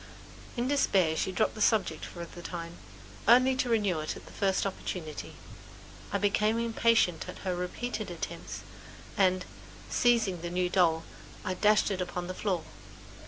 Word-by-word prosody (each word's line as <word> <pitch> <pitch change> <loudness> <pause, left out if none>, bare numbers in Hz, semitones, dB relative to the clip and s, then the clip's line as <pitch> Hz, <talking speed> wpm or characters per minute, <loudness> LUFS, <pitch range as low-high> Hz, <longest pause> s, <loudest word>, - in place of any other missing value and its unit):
In 240 +1 0
despair 190 - +3
she 175 - 0
had 185 - -6
dropped - - +2
the 215 - -7
subject 195 -8 +2
for 170 -1 -7
the 175 +1 -11
time, 170 -1 -6 0.5
only 255 +3 +6
to 255 - 0
renew 205 -7 +2
it 155 - -3
at - - -11
the - - -13
first 195 -1 +1
opportunity. 175 -5 -5 0.8
I - - +2
became 210 +2 +2
impatient 230 -6 +2
at - - -7
her 185 -1 0
repeated 180 +8 -3
attempts - - -6 0.5
and, 185 -2 +3 0.5
seizing 225 -8 +3
the 175 - -3
new 180 0 0
doll, 165 -3 +3 0.4
I 185 - 0
dashed 210 +2 +3
it 190 -2 -1
upon 180 0 -3
the 185 - -4
floor. 185 -3 -1
185 Hz, 165 wpm, -30 LUFS, 175-220 Hz, 0.8 s, only